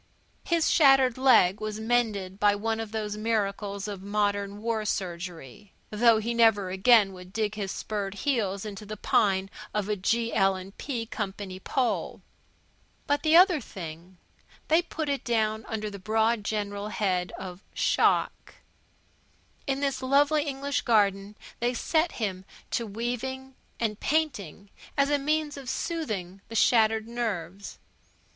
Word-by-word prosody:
His 335 -4 +2
shattered 270 -5 +5
leg 225 -8 +5
was 215 0 -4
mended 220 -5 0
by 205 0 +4
one 225 +2 -2
of 225 -2 -5
those 210 -1 -3
miracles 205 -2 -2
of 200 -2 -6
modern 205 0 -1
war 225 0 -1
surgery, 180 -2 -5 0.2
though 225 +1 +5
he 225 +2 -2
never 220 -5 +3
again 195 +1 +5
would 180 0 -12
dig 215 0 -1
his 200 -3 -4
spurred 205 -2 -4
heels 205 -6 -1
into 210 0 -7
the 210 +1 -7
pine 195 -2 +2 0.3
of 210 -2 0
a 210 - +1
G.L. 195 -2 0
& - - -36
P. 240 -5 -3
Company 195 -3 -5
pole. 245 +4 -2 0.8
But 290 0 +1
the 315 +1 +5
other 360 -4 +6
thing 175 -2 -9 0.5
they 320 +2 +5
put 320 -3 -5
it 280 -1 -1
down 220 -2 0
under 215 -1 -3
the 200 - -8
broad 220 +2 +1
general 205 -1 -3
head 185 -4 -1
of 185 -1 -8
shell - - +3
shock. - - -22 1.1
In 270 0 -1
the 275 -1 +1
lovely 290 +3 +3
English 280 -1 -2
garden 200 -2 +2 0.2
they 245 +1 0
set 320 +7 +1
him 190 -5 -3 0.3
to 235 - -1
weaving 245 +5 -4 0.3
and 215 -3 -1
painting, 205 - -2 0.3
as 280 +1 +3
a 290 - +3
means 300 +1 -1
of 270 -2 -7
soothing 215 - -3
the 225 - -8
shattered 220 -1 +3
nerves. 200 -6 -4
215 Hz, 145 wpm, -27 LUFS, 200-245 Hz, 1.1 s, other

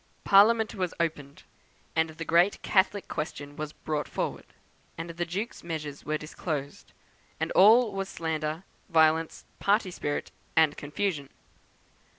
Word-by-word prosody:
"Parliament 215 +2 +5
was 185 -3 -3
opened, 145 -4 -3 0.5
and 160 0 +2
the 160 +1 -7
great 175 +5 +3
Catholic 200 +1 +2
question 145 -2 -5
was 155 0 -5
brought 150 -1 -3
forward, - - -4 0.5
and 165 +1 -5
the 170 +1 -3
Duke's 200 +7 -4
measures 150 -4 -5
were 155 +1 -1
disclosed, 150 -2 -5 0.5
and - - -1
all 220 +4 +6
was 195 0 -3
slander, 160 0 -3 0.3
violence, 160 -1 +3
party 200 -1 +2
spirit, 145 -4 -3 0.2
and 160 -2 +4
confusion. 150 -1 -3
165 Hz, 130 wpm, -28 LUFS, 150-190 Hz, 0.5 s, all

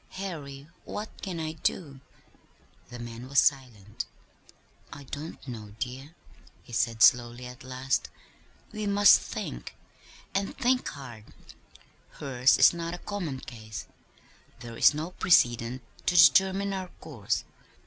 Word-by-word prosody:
Harry, 150 -7 -7 0.2
what 210 +1 -5
can 185 -4 -4
I 155 -1 -3
do?" 155 -3 -3 0.9
The 120 - -8
man 120 +1 -8
was 140 - -3
silent. 120 -9 +1 0.9
"I 140 0 -9
don't 145 +2 -8
know, 105 -4 -8
dear," 130 +7 -6 0.5
he 120 - -14
said 115 0 +2
slowly, 120 -1 +4
at 125 +1 -10
last. 130 +1 -2 0.6
"We 215 -1 -4
must 200 0 +7
think - - -6 0.6
and 195 0 -2
think 255 -1 +1
hard. 120 -6 -9 0.9
Hers 130 -2 +2
is - - +7
not 170 0 -4
a 175 - -14
common 175 -11 -4
case. 110 -3 -8 0.8
There 115 -1 -8
is 145 - +5
no 160 +4 -4
precedent 120 -8 +2 0.2
to 180 - +2
determine 195 +2 +5
our 190 -1 -4
course. 115 -7 -3
135 Hz, 130 wpm, -28 LUFS, 120-175 Hz, 0.9 s, must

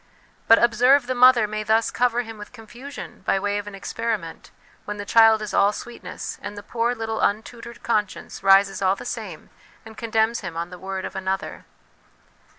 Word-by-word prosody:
But, 225 - +8
observe, 245 +3 +4
the 255 - -2
mother 250 -3 +6
may 215 0 -4
thus 220 +1 +1
cover 245 0 +1
him 225 -2 -10
with 210 - -10
confusion 245 +4 -10
by - - +1
way 205 +1 -1
of 205 - -8
an 205 - -7
experiment 200 -3 -4 0.4
when 210 0 -5
the 205 - -6
child 225 0 +5
is 210 - -6
all 200 +1 +4
sweetness, 210 -4 -8
and 205 0 -7
the 205 - -8
poor 235 +3 -1
little 225 -1 -4
untutored 230 +3 -3
conscience 210 -4 -2
rises 195 0 +4
all 190 0 +2
the - - -10
same, - - -7 0.3
and 220 0 -12
condemns 225 0 0
him 175 -4 -7
on 170 +1 -4
the 180 - -10
word 190 0 -5
of - - -7
another. 190 0 -4
220 Hz, 185 wpm, -23 LUFS, 200-235 Hz, 0.4 s, But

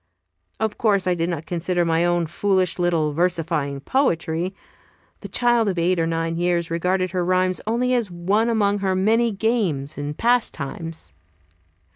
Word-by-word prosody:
Of 220 -1 -2
course 205 -4 +2
I 180 - +2
did 170 0 -1
not 165 -3 -4
consider 175 0 -1
my 165 0 +2
own 175 -1 +1
foolish 185 +1 0
little 165 -4 +1
versifying 165 -4 -1
poetry. 175 - 0 0.6
The - - -8
child 240 -3 +2
of 185 - -3
eight 175 +1 +1
or 165 - +1
nine 165 0 -1
years 175 -1 0
regarded 185 +2 0
her 180 0 -1
rhymes 185 +1 +1
as - - -14
only 250 +3 +1
one 195 +5 0
among 205 -3 +1
her 190 -1 0
many 225 +5 +2
games 195 - -1
and 145 +1 -4
pastimes. 165 - -1
180 Hz, 155 wpm, -22 LUFS, 165-205 Hz, 0.6 s, course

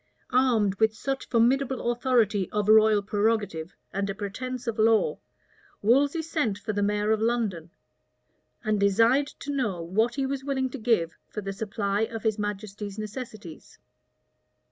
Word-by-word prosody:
Armed 240 -6 +3
with 220 0 +3
such 270 +3 -3
formidable 250 +1 +2
authority 235 -6 +1
of 210 -1 -1
royal 215 -1 +6
prerogative 205 -5 -1 0.2
and 200 +1 -1
a 195 - -3
pretence 245 +5 -5
of 230 -2 -3
law, 220 0 +3 0.6
Wolsey 280 +8 +3
sent 300 -11 -1
for 210 +1 -4
the 205 - -1
mayor 210 +1 +1
of 220 -1 +1
London, 220 -8 -1 0.9
and 215 -1 +1
desired 230 +8 +4
to 285 - -7
know 215 -10 -1
what 215 +8 0
he 275 -1 0
was 270 0 -3
willing 265 -2 -1
to 275 - -6
give 215 -8 +1
for 210 - -5
the 195 0 -4
supply 200 0 -2
of 225 0 -3
his 220 -2 0
majesty's 205 0 -5
necessities. 215 -5 -8
220 Hz, 150 wpm, -27 LUFS, 205-245 Hz, 0.9 s, royal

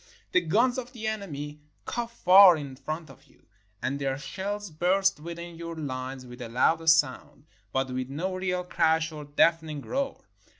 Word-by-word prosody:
The 180 - +4
guns 230 +10 +2
of 250 +1 -8
the 225 -3 -7
enemy 150 -9 -4 0.2
cough 235 -1 -4
far 185 -1 +9
in 140 -3 -7
front 155 +2 -6
of 135 +1 -18
you, - - -27 0.4
and 135 +2 -1
their 135 -1 -1
shells 200 +5 -5
burst 190 +3 +2
within 170 +1 -8
your 170 0 -6
lines 130 -3 -5
with 125 +1 -11
a 120 - -6
louder 160 +7 +2
sound 150 -2 +2
— - - -39
but 130 0 -1
with 130 0 -3
no 170 +7 -3
real 180 -1 -1
crash 160 -2 +1
or 150 -1 -8
deafening 155 0 +2
roar. 275 - -3
160 Hz, 175 wpm, -27 LUFS, 140-190 Hz, 0.4 s, far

